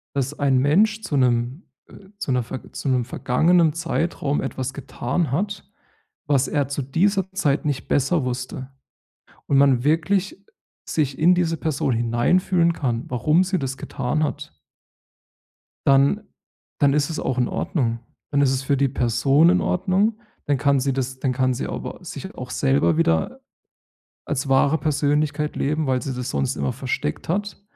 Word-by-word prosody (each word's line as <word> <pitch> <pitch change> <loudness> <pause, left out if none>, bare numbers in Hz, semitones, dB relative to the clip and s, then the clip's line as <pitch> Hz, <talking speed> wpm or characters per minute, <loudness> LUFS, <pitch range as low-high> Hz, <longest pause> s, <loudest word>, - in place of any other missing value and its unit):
dass 140 +1 -2
ein 135 -3 +3
Mensch 205 +11 +3
zu 150 - -2
'nem 125 - +1 0.2
äh, 195 - -15
zu 190 - -4
'ner 125 - +1
verg 125 - -9
zu - - -3
'nem 125 -2 +2
vergangenen 160 +7 +2
Zeitraum 165 -3 -1
etwas 135 -1 -4
getan 140 +2 -3
hat, 200 +6 -2 0.6
was 140 -2 +2
er 145 -2 0
zu 140 0 -3
dieser 190 +7 +1
Zeit 150 -7 0
nicht 145 -3 -2
besser 145 +1 +1
wusste 130 +1 -5 0.8
und 140 - +3
man 135 -3 +4
wirklich 190 +5 0 0.4
sich 145 -4 -1
in 175 +3 +5
diese 170 -2 +1
Person 145 -4 -1
hineinfühlen 165 +10 +2
kann, 120 -7 -2
warum 150 +8 +2
sie 185 0 0
das 135 -1 -4
getan 150 +5 -2
hat 150 0 -4 1.3
dann 140 +10 +4 0.5
dann 140 -1 +4
ist 145 0 +1
es 160 - -4
auch 130 - -2
in 125 - +2
Ordnung. 115 -7 -1 0.3
Dann 145 -1 +2
ist 135 - +4
es 130 0 -1
für 140 +1 +1
die 140 0 +2
Person 135 +5 +3
in 185 +1 +4
Ordnung, 195 +5 +1 0.3
dann 145 -2 +1
kann 140 0 +2
sie 135 +1 0
das 130 0 -3
dann 130 -2 0
kann 130 0 +1
sie - - -3
aber - - -6
sich - - -8
auch - - -8
selber 70 +5 +2
wieder 80 -1 +1 0.8
als 135 +1 -2
wahre 140 +3 +3
Persönlichkeit 150 0 0
leben, 150 +1 0
weil 130 -1 +1
sie 135 0 -4
das 125 +1 -4
sonst 135 -1 -1
immer 130 - -1
versteckt 125 - -4
hat. 200 +3 -2
140 Hz, 165 wpm, -22 LUFS, 130-165 Hz, 1.3 s, in